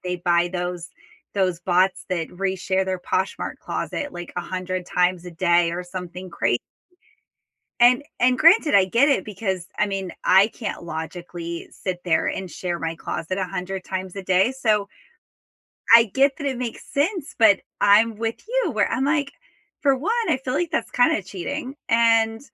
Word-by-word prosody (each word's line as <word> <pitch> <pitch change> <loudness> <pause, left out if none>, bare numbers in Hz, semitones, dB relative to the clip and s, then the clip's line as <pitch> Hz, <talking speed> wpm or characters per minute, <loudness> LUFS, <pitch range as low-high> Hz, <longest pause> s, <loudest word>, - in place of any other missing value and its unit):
they 180 0 -2
buy 175 0 +2
those 180 -1 -4 0.5
those 185 -3 +1
bots 185 +1 +1
that 170 -3 -2
reshare 190 0 -1
their 185 -1 -2
Poshmark 190 +2 -2
closet 290 -1 -4
like 175 -1 -8
100 185 0 -4
times 180 0 +1
a 175 - -8
day 170 0 +2
or 180 +1 -3
something 180 0 -8
cra 170 - 0 1.3
And 245 +3 +5 0.2
and 250 +1 +3
granted, 330 - +5
I 195 - +6
get 235 +9 +3
it 270 -10 +2
because, 190 -4 -3
I 210 - +3
mean, 195 -2 -4
I 190 +2 +6
can't 215 -6 -6
logically 170 +1 -6
sit 185 -2 -4
there 160 -3 +2
and 190 -1 -3
share 175 0 -4
my 165 0 -3
closet 165 +2 -4
100 185 0 -4
times 185 -1 -5
a 195 - -6
day, 190 +6 +2
so 215 -6 +1 1.1
I 230 0 +9
get 270 +5 +2
that 285 -3 -5
it 260 -3 -2
makes 240 -3 -5
sense, 330 +2 -1
but 220 -4 +6 0.2
I'm 215 +2 +5
with 225 +1 -2
you, - - 0
where 215 -4 +1
I'm 255 +3 0
like, 285 -1 0 0.5
for 275 -2 +3
1, 390 - -1 0.2
I - - +2
feel 260 -1 -4
like 330 +2 0
that's 315 - -2
kinda 245 -4 +3
cheating, 250 - -5
and 225 -1 +3
190 Hz, 170 wpm, -23 LUFS, 180-245 Hz, 1.3 s, I